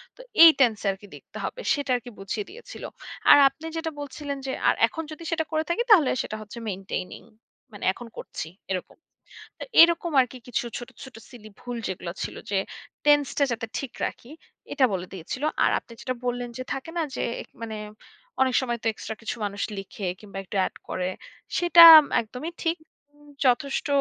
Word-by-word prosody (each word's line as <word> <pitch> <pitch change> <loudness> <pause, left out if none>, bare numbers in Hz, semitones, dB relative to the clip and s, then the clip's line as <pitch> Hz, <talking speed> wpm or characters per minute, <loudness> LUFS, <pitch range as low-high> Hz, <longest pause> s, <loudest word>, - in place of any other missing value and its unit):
তো - - -13 0.2
এই 335 - +12
টেন্স 235 -5 +4
আর 195 - 0
কি 205 - -12
লিখতে - - -13
হবে। - - -5
সেটা 285 -2 -3
আরকি 245 0 -5
বুঝিয়ে 200 +2 -4
দিয়েছিল। 480 +4 -11 0.5
আর - - +10
আপনি 285 +4 -13
যেটা 325 0 -3
বলছিলেন 285 0 -5
যে 265 - -2 0.2
আর - - +4
এখন 325 - -6
যদি 310 +2 -9
সেটা 325 -1 +1
করে 315 0 +1
থাকি 420 +8 +1
তাহলে 330 -11 +7
সেটা - - -5
হচ্ছে 215 +2 -11
মেইনটেইনিং, 190 -1 -5 0.5
মানে 205 - -10
এখন 240 +4 -10
করছি - - -6 0.2
এরকম। 185 -1 -4 0.6
তো - - -5 0.2
এরকম 340 0 +4
আরকি 255 0 -4
কিছু 245 - -2
ছোট, 240 -1 -8
ছোট 260 -2 -12
সিলি 220 -4 -12
ভুল 245 -1 -6
যেগুলো 180 -2 -5
ছিল - - -5 0.2
যে 195 - +2 0.5
টেন্সটা 290 -1 +3
যাতে 230 -1 -3
ঠিক 270 -3 -6
রাখি 245 - -7 0.4
এটা 275 -2 +4
বলে 185 -1 -3
দিয়েছিল। 190 - -6 0.2
আর - - +4
আপনি 235 - -16
যেটা 255 - -3
বললেন 245 0 -2
যে 255 - -4
থাকে 270 +4 -6
না 335 - +1
যে - - -2 0.2
এক - - -21 0.2
মানে 220 -1 -5 0.6
অনেক 260 -1 +3
সময় 240 -2 -2
তো 230 - 0
এক্সট্রা 220 - -7
কিছু 225 - -3
মানুষ 200 0 -4 0.2
লিখে 195 0 -6
কিংবা 200 -2 -11
একটু 195 - -9
অ্যাড - - -2
করে, 185 0 -2 0.5
সেটা 335 -2 +11 0.2
একদমই 250 +9 -7
ঠিক। 330 +1 0 0.4
উম 295 0 -21 0.2
যথেষ্ট 265 +4 +1
250 Hz, 185 wpm, -25 LUFS, 215-300 Hz, 0.6 s, এই